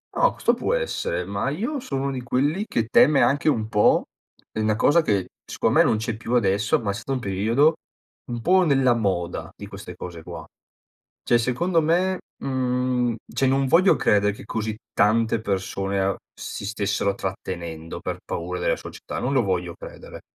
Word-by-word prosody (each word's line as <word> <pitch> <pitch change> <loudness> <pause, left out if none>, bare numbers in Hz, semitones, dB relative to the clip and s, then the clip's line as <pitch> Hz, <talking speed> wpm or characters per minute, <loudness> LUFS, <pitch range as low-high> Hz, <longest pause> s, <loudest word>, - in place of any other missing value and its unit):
No, - - +3
questo - - +2
può - - 0
essere 485 - -2
ma 100 +7 -2
io 230 - -2
sono 135 - -3
uno 140 - -1
di 130 -2 -4
quelli 145 - 0
che 115 - 0
teme 140 +5 +5
anche 145 +2 +2
un 110 -7 0
po' 105 -2 +3 0.5
è - - -5
una 110 0 +2
cosa 145 +9 +4
che 100 - 0
secondo - - -1
me - - +5
non 110 - +2
c'è 110 +1 -3
più 120 +2 -2
adesso 105 -2 +2
ma 105 -4 -2
è - - -3
stato 115 +6 -4
un 130 - -1
periodo, 115 +9 +2 0.6
un 120 - -3
po' 185 +7 +4
nella 135 -6 +3
moda 95 -6 -2
di - - -8
queste - - -9
cose 85 -2 -8
qua. - - -8 0.8
Cioè 120 - +4
secondo 165 +9 +1
me, 180 +4 +2 0.3
mhmm, 125 -2 0 0.2
cioè 135 - 0
non 135 +1 +2
voglio 175 +7 +5
credere 105 0 +3
che 100 - -12
così 110 0 -3 0.2
tante 110 +2 +3
persone 95 -1 -2
a 95 0 +1 0.2
si - - -7
stessero 100 -1 0
trattenendo 85 -4 -5
per - - -4
paura 90 +2 -4
della - - +1
società. - - -7
Non 135 - -1
lo 130 -3 +3
voglio 90 -3 -2
credere. - - -11
115 Hz, 185 wpm, -24 LUFS, 100-135 Hz, 0.8 s, teme